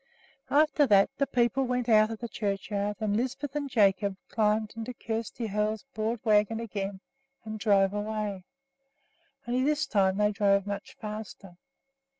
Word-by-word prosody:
After 300 0 +4
that 200 0 +5
the 280 - +2
people 240 +2 +1
went 250 -1 -1
out 215 -2 +5
of 225 - -5
the 235 - -5
churchyard, 205 -1 -2
and 210 -2 0
Lisbeth 265 +4 -2
and 285 -1 -2
Jacob 200 -4 +2
climbed 215 0 +1
into 230 +2 -6
Kjersti 225 +1 -4
Hoel's 210 +1 -1
broad 220 +1 -2
wagon 215 +1 +3
again 200 -4 -4 0.4
and 215 0 -6
drove 200 -2 +3
away, 210 -2 -3 1.0
only 250 +2 +1
this 300 +2 +1
time 190 -2 +2
they 210 0 +3
drove 200 -2 +2
much 200 0 -6
faster. 210 -3 -8
215 Hz, 150 wpm, -28 LUFS, 200-235 Hz, 1.0 s, that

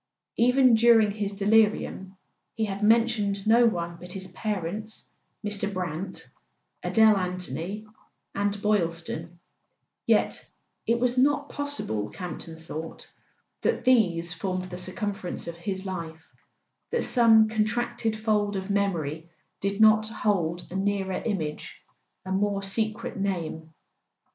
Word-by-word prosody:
Even 250 +1 +5
during 225 -2 +5
his 205 -1 -3
delirium 205 -2 +1 0.4
he 220 - 0
had 200 0 -5
mentioned 215 -3 +2
no 235 +2 +6
one 170 -5 -2
but 180 +1 -8
his 190 -1 -5
parents, 210 +2 -4 0.4
Mr. 205 -1 -1
Brant, 185 0 -5 0.5
Adele 220 -1 +5
Anthony 185 +2 -4 0.5
and 205 0 0
Boyl 205 -6 +2
ston; 165 0 -7 0.7
yet - - +2 0.4
it 235 +1 +2
was 250 +1 +1
not 285 +2 +2
possible, 285 - -2
Camp 180 - -6
ton 165 - -7
thought, 160 0 -8 0.5
that - - 0
these 175 -9 +3
formed 185 +2 -3
the 180 - -5
circumference 195 -1 -3
of 170 - -5
his 190 +2 -4
life, 165 -4 -7 0.6
that 475 - 0
some 225 -3 +5
contracted 225 +1 -1
fold 210 -2 0
of 190 +1 -3
memory 165 -5 -1 0.3
did 200 +1 -2
not 215 0 +6
hold 180 -6 -1
a - - -6
nearer 195 -1 -1
im¬ 200 -7 -1
age, 150 0 -7 0.5
a 190 - -5
more 200 +1 0
secret 215 +3 -1
name. 170 -5 -3
200 Hz, 130 wpm, -26 LUFS, 180-220 Hz, 0.7 s, no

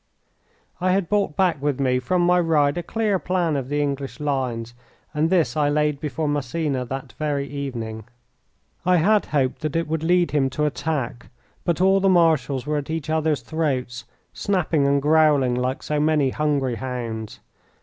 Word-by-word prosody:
I 185 +1 +2
had 190 -2 +1
brought 200 -7 +1
back 175 -7 +2
with 145 -2 -1
me 130 -2 +2
from 175 +8 0
my 180 +1 +4
ride 150 -4 +2
a 175 - -2
clear 210 +2 0
plan 175 -4 0
of 135 -2 -3
the 145 0 +1
English 140 0 -4
lines, 130 -5 -2 0.4
and 155 +2 +1
this 170 -4 +2
I 150 -2 +2
laid 150 -1 +1
before 150 +1 -3
Massena 145 -1 -1
that 135 +2 -6
very 145 -2 -1
evening. 120 -7 -5 0.8
I 180 +1 +4
had 205 +5 +3
hoped 135 -2 0
that 155 -1 -3
it 165 -1 0
would 160 0 -2
lead 175 +1 +2
him 140 -3 +2
to 150 - +2
attack, 145 -5 -3 0.4
but 170 0 0
all 190 +1 +5
the 195 0 +3
marshals 160 -7 +2
were 150 0 -1
at 145 0 -4
each 160 -1 -3
other's 155 -2 +1
throats, 130 -7 -2 0.3
snapping 170 -7 +1
and 140 0 +2
growling 150 -4 +4
like 125 +2 -2
so 150 -1 -1
many 150 -3 +2
hungry 140 -5 0
hounds. 115 -3 -5
150 Hz, 175 wpm, -23 LUFS, 135-165 Hz, 0.8 s, all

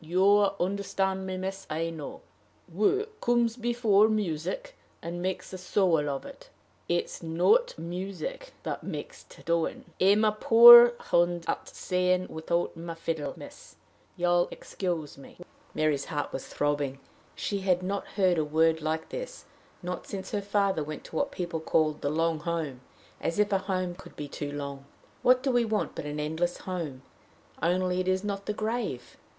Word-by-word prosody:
You 195 +5 +4
understand 190 0 -1
me, 185 0 -3
miss, 190 +1 -5
I 165 +2 -2
know: 155 -3 -8 0.5
work 425 +2 0
comes 240 -1 +2
before 230 -4 +3
music, 215 - -2 0.2
and 170 +1 -5
makes 185 +1 -3
the 185 - -7
soul 175 -5 +2
of 135 -1 -4
it; - - -12 0.4
it's 175 0 -1
not 180 - +2
the - - -9
music 195 - -5
that - - -4
makes - - -6
the - - -17
doing. 170 -1 -1 0.2
I'm 200 +3 +5
a 215 - +4
poor 235 +2 +10 0.2
hand 175 0 +2
at - - -2
saying 180 0 0
without 170 +3 -2
my 165 0 -6
fiddle, 160 -4 -3
miss: - - -12 0.4
you'll 175 0 +3
excuse 165 -7 -4
me." 135 - -14 0.4
Mary's 150 -3 +1
heart 150 -4 -3
was 135 - -5
throbbing. 145 -2 -1 0.4
She 200 - -2
had 185 -2 +1
not 200 +2 -3
heard 185 -4 +3
a - - +2
word 160 +2 +2
like 160 +1 -2
this - - -7 0.4
not 180 +1 -5
since 195 -1 -6
her 205 - -1
father 200 -4 +1
went 155 0 -7
to - - -11
what - - 0
people 170 -2 -3
call 155 -1 +2
the 150 -1 -4
"long 165 +1 0
home" 155 -6 -3 0.4
as 165 - -2
if 210 0 +2
a 195 - +3
home 185 -2 -2
could 180 - -14
be 145 - -6
too 145 0 -5
long! 140 -1 -6 0.4
What 255 +1 +4
do 270 - +1
we 245 -1 +3
want 220 -2 -1
but - - -6
an 150 0 -4
endless 160 +4 -1
home? 160 -8 -5 0.6
only 180 +2 +1
it 185 - -1
is 185 +1 +1
not 200 -1 -4
the 210 - 0
grave! 215 - -3
180 Hz, 170 wpm, -28 LUFS, 160-200 Hz, 0.6 s, poor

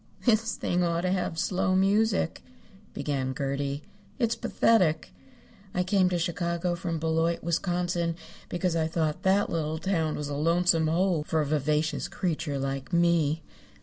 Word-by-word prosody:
"This 230 -1 +2
thing 180 0 0
ought 170 -1 +1
to 180 0 0
have 180 -3 -1
slow 185 +2 +1
music," 200 -1 +2 0.5
began 135 -2 -2
Gertie. 140 +1 -2 0.3
"It's 235 -3 +1
pathetic. 185 -12 +2 0.6
I 180 - +2
came 185 0 +3
to 180 - 0
Chicago 170 +1 -1
from 170 -1 -3
Beloit, 165 +1 0
Wisconsin, 175 0 0 0.3
because 175 -1 -1
I 160 -1 +1
thought 160 -2 -1
that 195 +2 +2
little 160 -1 -1
town 160 -3 0
was 150 - -4
a 145 - -4
lonesome 165 +1 +2
hole 170 0 +1
for 160 +1 -1
a 150 - +1
vivacious 150 +2 0
creature 155 -5 -2
like 135 +1 -3
me. 170 -3 +2
170 Hz, 150 wpm, -27 LUFS, 155-180 Hz, 0.6 s, came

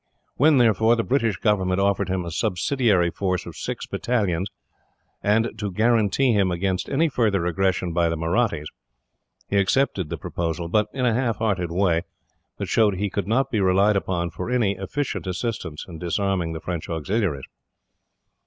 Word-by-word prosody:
When, 150 +1 +4
therefore, 115 -1 +4
the 115 - 0
British 115 -6 +1
government 95 -3 +1
offered 100 -1 +1
him 95 -1 -1
a 85 - -5
subsidiary 95 - +1
force 90 -1 -2
of 85 - -9
six - - -5
battalions, 100 -6 -1 0.7
and 110 +3 +2
to 105 -2 -3
guarantee 115 +4 +2
him 100 -3 +2
against 90 +1 -1
any 155 +4 +2
further 105 - +1
aggression 90 -1 0
by 85 -1 +2
the 80 - -2
Mahrattis, 85 0 0 0.8
he 100 - 0
accepted 100 - +1
the - - -4
proposal; 85 0 -3
but 105 +3 +2
in 130 -2 -1
a 120 - +3
half 120 -1 0
hearted 100 -6 0
way, 85 -2 +2 0.6
that - - -3
showed 105 -4 +3
he 100 +1 -2
could 100 -3 -2
not 135 +5 +1
be 110 - +1
relied 95 +3 +3
upon 85 -2 -1
for 80 - -5
any 120 -5 +2
efficient 115 +3 -3
assistance 90 -5 -4
in 85 -3 -9
disarming 90 -1 -1
his 80 - -7
French 85 -3 -4
auxiliaries. 85 - -1
100 Hz, 165 wpm, -23 LUFS, 90-115 Hz, 0.8 s, When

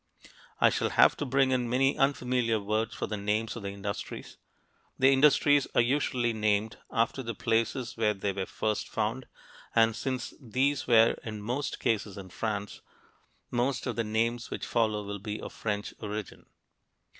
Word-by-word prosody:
I - - +5
shall - - 0
have - - +5
to 145 - -3
bring 135 0 +3
in 125 -2 0
many 135 +3 +2
unfamiliar 125 -4 +1
words 110 +2 -1
for - - -2
the 105 - -4
names 105 +2 -1
of 115 - -6
the 100 - -4
industries. 100 0 -6 0.6
The 135 +1 +5
industries 145 0 +4
are - - +6
usually 125 -2 +1
named 105 0 0
after 115 +2 0
the 115 -3 -5
places 115 +3 0
where 105 -2 +2
they 100 0 -2
were 95 0 -3
first 110 -1 -2
found, 115 +4 -2 0.5
and 115 -1 +4
since 130 0 -3
these 135 +3 0
were 115 -2 +5
in 110 -2 -6
most 125 +6 -3
cases 105 -3 -1
in 95 -2 -8
France, 105 -2 -4 0.7
most 125 +2 0
of 125 - -2
the 115 - 0
names 115 +2 -1
which - - -4
follow 110 -2 +1
will 100 0 -5
be 105 +2 -5
of - - -8
French 105 -1 -3
origin. 105 -1 -6
115 Hz, 165 wpm, -29 LUFS, 105-125 Hz, 0.7 s, are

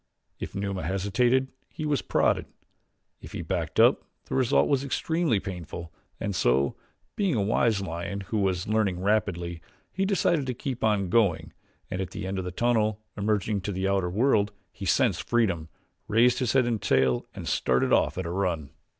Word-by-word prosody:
If - - -6
Numa 100 -1 -2
hesitated 120 - +1 0.2
he 155 - -6
was 150 -2 +1
prodded. - - +1 0.7
If - - -11
he - - -4
backed - - -2
up - - +6 0.2
the - - -7
result 130 -3 +3
was 140 -2 +1
extremely 160 - 0
painful 85 -3 -7 0.3
and 100 -2 -2
so, 65 -2 +2 0.4
being 195 -7 +1
a 105 - +1
wise 110 0 +2
lion 85 +2 -4
who 105 +2 -2
was 95 -3 0
learning 105 -4 +1
rapidly, 90 -5 0 0.3
he 190 +1 -1
decided 170 -7 +1
to 125 - -2
keep 130 0 -4
on 100 -4 +1
going 85 -8 +2 0.4
and 90 - -2
at 95 - -3
the - - -6
end 95 0 -2
of 95 - -4
the 90 - -4
tunnel, 110 0 +1 0.2
emerging 105 0 0
into 100 +1 -3
the 95 0 -1
outer 95 -2 +1
world, 105 0 +2 0.2
he - - -8
sensed - - +1
freedom, 95 -10 +1 0.4
raised 120 +3 +4
his 125 -4 0
head 130 -2 +4
and 115 -3 -1
tail 65 -2 +2
and - - -6
started 65 0 +2
off - - +2
at 95 - -2
a 85 - -3
run. 90 -6 -1
100 Hz, 180 wpm, -27 LUFS, 90-120 Hz, 0.7 s, up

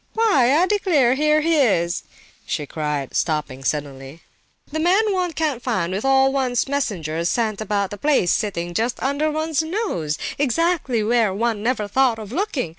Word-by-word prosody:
"Why, 290 - +3
I 350 - +4
declare, 350 -11 +2
here 300 +2 +2
he 325 +1 +2
is!" 180 - +1 0.4
she 150 - -3
cried, 150 -2 -4
stopping 150 -5 -1
suddenly. 140 +2 -4 0.5
"The 315 - -2
man 390 +6 +3
one 365 -2 -1
can't 305 -6 -2
find 185 -9 -1
with 195 - -3
all 270 0 +3
one's 255 -3 0
messengers 175 - -2
sent 220 -3 -1
about 200 -2 -1
the 205 - -7
place, 280 - +2
sitting 175 -4 -2
just 230 +6 -1
under 285 +3 0
one's 310 0 -1
nose, 315 - -2 0.2
exactly 285 -4 +1
where 225 -2 +2
one 225 0 -1
never 220 -2 -1
thought 250 +2 +2
of 215 -2 -9
looking! 330 - -2
245 Hz, 165 wpm, -21 LUFS, 185-305 Hz, 0.5 s, I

